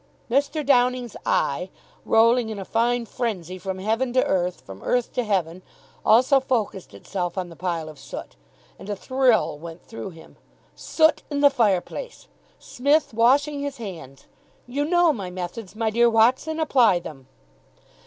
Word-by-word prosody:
Mr. 285 Hz, +3 st, +1 dB
Downing's 250 Hz, -2 st, +2 dB
eye, -, -, 0 dB, 0.4 s
rolling 230 Hz, +1 st, +4 dB
in 215 Hz, -, -5 dB
a 195 Hz, -, -6 dB
fine 235 Hz, +2 st, 0 dB
frenzy 185 Hz, -7 st, -4 dB
from 190 Hz, +1 st, -4 dB
heaven 225 Hz, +6 st, -1 dB
to 255 Hz, -, +3 dB
earth, 180 Hz, -1 st, -1 dB
from 95 Hz, 0 st, -12 dB
earth 245 Hz, -1 st, -1 dB
to 250 Hz, -, 0 dB
heaven, 185 Hz, -5 st, -1 dB, 0.4 s
also 255 Hz, +5 st, +5 dB
focussed 225 Hz, -8 st, -3 dB
itself 180 Hz, -2 st, -4 dB
on 180 Hz, -2 st, -3 dB
the 165 Hz, -, -12 dB
pile 170 Hz, -2 st, -3 dB
of 155 Hz, -2 st, -11 dB
soot; -, -, -9 dB, 0.4 s
and 200 Hz, -, -10 dB
a 205 Hz, -, -1 dB
thrill 250 Hz, -, +1 dB
went 165 Hz, +1 st, -10 dB
through 225 Hz, -3 st, -7 dB
him. 165 Hz, -3 st, -15 dB, 0.4 s
Soot 315 Hz, -1 st, +2 dB
in 285 Hz, -1 st, -2 dB
the 285 Hz, -1 st, +6 dB
fireplace! 230 Hz, -, -1 dB, 0.3 s
Smith 285 Hz, +2 st, 0 dB
washing 280 Hz, +6 st, +3 dB
his 285 Hz, -1 st, -4 dB
hands! 165 Hz, -, -9 dB, 0.4 s
("You 280 Hz, +4 st, -2 dB
know 345 Hz, 0 st, +3 dB
my 195 Hz, -7 st, -5 dB
methods, 185 Hz, +3 st, -7 dB
my 220 Hz, 0 st, -1 dB
dear 235 Hz, +2 st, +4 dB
Watson. 255 Hz, +8 st, +2 dB
Apply 250 Hz, -, +4 dB
them.") 135 Hz, -6 st, -9 dB
225 Hz, 155 wpm, -24 LUFS, 185-260 Hz, 0.4 s, the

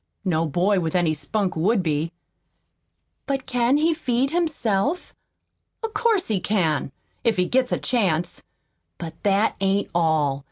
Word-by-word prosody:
No 165 Hz, -3 st, +1 dB
boy 185 Hz, +6 st, +2 dB
with 165 Hz, 0 st, -2 dB
any 175 Hz, -3 st, +2 dB
spunk 180 Hz, +6 st, -2 dB
would 190 Hz, +5 st, +2 dB
be." 155 Hz, 0 st, -1 dB, 1.2 s
"But 270 Hz, -2 st, -1 dB
can 250 Hz, +1 st, +2 dB
he 320 Hz, +2 st, +3 dB
feed 265 Hz, -3 st, 0 dB
himself?" 305 Hz, -, 0 dB, 0.7 s
"Of 450 Hz, -1 st, -3 dB
course 425 Hz, -3 st, +2 dB
he 210 Hz, -4 st, +1 dB
can 165 Hz, -9 st, 0 dB, 0.3 s
if 230 Hz, -4 st, +2 dB
he 180 Hz, -, +3 dB
gets 255 Hz, +5 st, +1 dB
a -, -, +2 dB
chance! 180 Hz, -9 st, 0 dB, 0.6 s
But 165 Hz, -2 st, -6 dB
that 205 Hz, +2 st, +2 dB
ain't 195 Hz, +1 st, +1 dB
all. 160 Hz, -5 st, +2 dB
200 Hz, 145 wpm, -23 LUFS, 165-255 Hz, 1.2 s, he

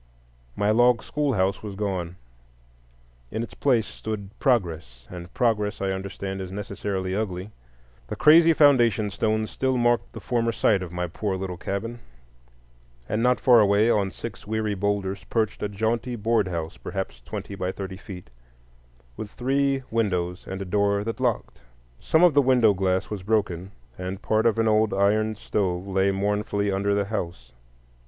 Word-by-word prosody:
My 105 Hz, +1 st, +2 dB
log 120 Hz, +1 st, +4 dB
schoolhouse 110 Hz, -11 st, 0 dB
was 105 Hz, -2 st, -7 dB
gone. 95 Hz, -4 st, -3 dB, 1.1 s
In 110 Hz, -, -3 dB
its 105 Hz, -, -8 dB
place 120 Hz, -6 st, +2 dB
stood 105 Hz, -3 st, -6 dB
Progress; 80 Hz, -, 0 dB
and 90 Hz, 0 st, -8 dB
Progress, 110 Hz, -3 st, +1 dB
I 95 Hz, -1 st, -1 dB
understand, 95 Hz, 0 st, -5 dB
is 95 Hz, -1 st, -6 dB
necessarily 95 Hz, -1 st, -3 dB
ugly. 100 Hz, -1 st, -3 dB, 0.6 s
The -, -, -4 dB
crazy 165 Hz, +2 st, +7 dB
foundation 120 Hz, -9 st, +4 dB
stones 110 Hz, +1 st, -1 dB
still 130 Hz, -1 st, 0 dB
marked 120 Hz, 0 st, +1 dB
the -, -, -7 dB
former 115 Hz, -2 st, 0 dB
site 100 Hz, -3 st, +2 dB
of 90 Hz, -2 st, -6 dB
my 90 Hz, 0 st, -2 dB
poor 95 Hz, +3 st, -3 dB
little 95 Hz, -1 st, -4 dB
cabin, 105 Hz, +6 st, -4 dB, 1.1 s
and 110 Hz, +2 st, -1 dB
not 125 Hz, +1 st, +3 dB
far 125 Hz, -2 st, +6 dB
away, 105 Hz, +2 st, +4 dB
on 100 Hz, -3 st, +1 dB
six 110 Hz, +3 st, -8 dB
weary 110 Hz, -1 st, -1 dB
boulders, 100 Hz, -1 st, -2 dB
perched 110 Hz, -2 st, -1 dB
a 105 Hz, -, -1 dB
jaunty 115 Hz, +4 st, -1 dB
board 110 Hz, -2 st, +1 dB
house, 80 Hz, -4 st, -4 dB
perhaps -, -, -5 dB
twenty 100 Hz, -, -7 dB
by 95 Hz, -1 st, -2 dB
thirty 95 Hz, -1 st, -6 dB
feet, 90 Hz, -, -10 dB, 0.8 s
with 105 Hz, -, -6 dB
three 135 Hz, +3 st, 0 dB
windows 90 Hz, -5 st, -1 dB
and 95 Hz, +1 st, -4 dB
a -, -, -9 dB
door 100 Hz, +1 st, +1 dB
that 115 Hz, +3 st, -4 dB
locked. 120 Hz, -, -2 dB, 0.4 s
Some 160 Hz, +2 st, +2 dB
of 175 Hz, -3 st, +6 dB
the 145 Hz, -, +5 dB
window 125 Hz, -5 st, +4 dB
glass 95 Hz, 0 st, 0 dB
was 105 Hz, -3 st, -4 dB
broken, 95 Hz, -3 st, -1 dB, 0.3 s
and 95 Hz, +1 st, -4 dB
part 110 Hz, +1 st, +2 dB
of 115 Hz, -, +1 dB
an 115 Hz, 0 st, +2 dB
old 110 Hz, -1 st, +3 dB
iron 110 Hz, +2 st, +2 dB
stove 95 Hz, -3 st, -2 dB
lay 95 Hz, 0 st, +1 dB
mournfully 100 Hz, +1 st, -1 dB
under 100 Hz, +1 st, +1 dB
the 100 Hz, 0 st, +1 dB
house. 85 Hz, -, -5 dB
100 Hz, 160 wpm, -25 LUFS, 95-115 Hz, 1.1 s, crazy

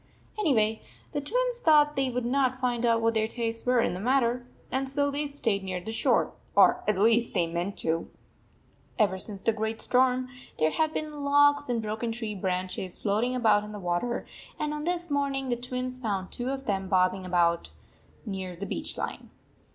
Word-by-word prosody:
Anyway, 225 Hz, -, +2 dB, 0.3 s
the 290 Hz, -, -2 dB
Twins -, -, 0 dB
thought 300 Hz, -5 st, +5 dB
they 270 Hz, -1 st, +1 dB
would 250 Hz, -1 st, -2 dB
not 260 Hz, 0 st, +1 dB
find 245 Hz, -2 st, 0 dB
out 230 Hz, -1 st, +3 dB
what 230 Hz, 0 st, +3 dB
their 220 Hz, -1 st, +1 dB
tastes 230 Hz, 0 st, -3 dB
were 250 Hz, -1 st, +4 dB
in 230 Hz, -, +1 dB
the 180 Hz, -, -5 dB
matter, 245 Hz, +1 st, +1 dB, 0.2 s
and 265 Hz, +1 st, -1 dB
so 285 Hz, +1 st, +2 dB
they 290 Hz, +1 st, -2 dB
stayed 230 Hz, -9 st, -1 dB
near 185 Hz, -1 st, -3 dB
the 185 Hz, +5 st, -6 dB
shore, 225 Hz, -, +2 dB, 0.2 s
or -, -, +5 dB
at 210 Hz, -2 st, +2 dB
least 230 Hz, +3 st, +3 dB
they 175 Hz, -3 st, +3 dB
meant 170 Hz, +4 st, -3 dB
to. 165 Hz, +1 st, 0 dB, 0.9 s
Ever 195 Hz, -5 st, +2 dB
since 195 Hz, 0 st, -6 dB
the 225 Hz, -, +3 dB
great 220 Hz, 0 st, -3 dB
storm 255 Hz, 0 st, +2 dB, 0.3 s
there 155 Hz, 0 st, +2 dB
had 315 Hz, -, +1 dB
been 300 Hz, -2 st, -4 dB
logs 290 Hz, 0 st, +4 dB
and 230 Hz, -2 st, 0 dB
broken 220 Hz, +2 st, -2 dB
tree 225 Hz, -2 st, -4 dB
branches 185 Hz, -1 st, -3 dB
float 210 Hz, +2 st, +1 dB
ing 250 Hz, +1 st, -1 dB
about 215 Hz, -4 st, +3 dB
in 210 Hz, 0 st, -8 dB
the 210 Hz, -, -6 dB
water, 180 Hz, +7 st, -1 dB, 0.3 s
and 300 Hz, 0 st, -2 dB
on 300 Hz, 0 st, -4 dB
this 350 Hz, -2 st, -1 dB
morn 280 Hz, -1 st, +1 dB
ing, 270 Hz, -1 st, -3 dB
the 240 Hz, -, +1 dB
Twins 250 Hz, +1 st, -4 dB
found 200 Hz, -6 st, -3 dB
tw 245 Hz, -, -4 dB
r -, -, -1 dB
o -, -, 0 dB
of 270 Hz, 0 st, -6 dB
them 195 Hz, -2 st, -1 dB
bobbing 185 Hz, 0 st, +2 dB
about 175 Hz, -2 st, +1 dB, 0.6 s
near 190 Hz, -4 st, -5 dB
the 195 Hz, +4 st, -5 dB
beach -, -, -4 dB
line. -, -, -5 dB
235 Hz, 205 wpm, -28 LUFS, 200-270 Hz, 0.9 s, thought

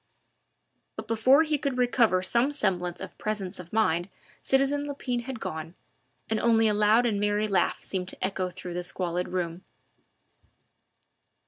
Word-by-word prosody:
But -, -, -7 dB
before 255 Hz, +7 st, +5 dB
he 305 Hz, -2 st, 0 dB
could 275 Hz, -3 st, -2 dB
recover 235 Hz, -7 st, +3 dB
some 235 Hz, +8 st, +2 dB
semblance 180 Hz, -10 st, 0 dB
of -, -, -8 dB
presence 200 Hz, -3 st, -2 dB
of 175 Hz, -1 st, -10 dB
mind 175 Hz, -5 st, +1 dB, 0.3 s
citizen 275 Hz, +2 st, +1 dB
Lepine 250 Hz, -4 st, -3 dB
had 260 Hz, -3 st, -5 dB
gone, 160 Hz, -1 st, -6 dB, 0.5 s
and 220 Hz, -1 st, 0 dB
only 225 Hz, -1 st, +4 dB
a 210 Hz, -, +2 dB
loud 215 Hz, +3 st, +4 dB
and 215 Hz, -4 st, 0 dB
merry 205 Hz, +1 st, +1 dB
laugh 195 Hz, -2 st, 0 dB
seemed 185 Hz, -2 st, -3 dB
to 185 Hz, -, -4 dB
echo 190 Hz, -1 st, -2 dB
through 180 Hz, 0 st, -8 dB
the 180 Hz, 0 st, -3 dB
squalid 180 Hz, -1 st, -2 dB
room. 175 Hz, 0 st, -3 dB
210 Hz, 150 wpm, -27 LUFS, 180-240 Hz, 0.5 s, before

